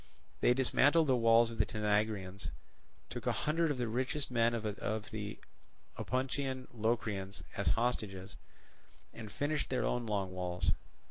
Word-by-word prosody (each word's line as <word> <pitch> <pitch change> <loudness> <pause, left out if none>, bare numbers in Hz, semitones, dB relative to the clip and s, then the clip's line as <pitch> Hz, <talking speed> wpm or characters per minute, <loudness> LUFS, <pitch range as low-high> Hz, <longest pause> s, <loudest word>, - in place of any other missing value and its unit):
They 125 - +4
dismantled 145 +5 +4
the 130 -3 +4
walls 115 0 +5
of 115 - -8
the 105 - +5
Tanagraeans, 105 -2 0 0.6
took - - -5
a - - +4
hundred 165 +2 +2
of 145 - 0
the 120 -1 -1
richest 130 +5 -1
men 115 -1 +3
of 115 - -3
the 105 0 -3 0.6
Opuntian 130 0 -2
Locrians 105 -4 -1
as - - -2
hostages, 105 -5 0 0.8
and 110 -2 -8
finished 145 +4 -1
their 130 - +1
own 120 -1 0
long 100 -3 -1
walls. 90 -1 0
115 Hz, 140 wpm, -34 LUFS, 105-130 Hz, 0.8 s, walls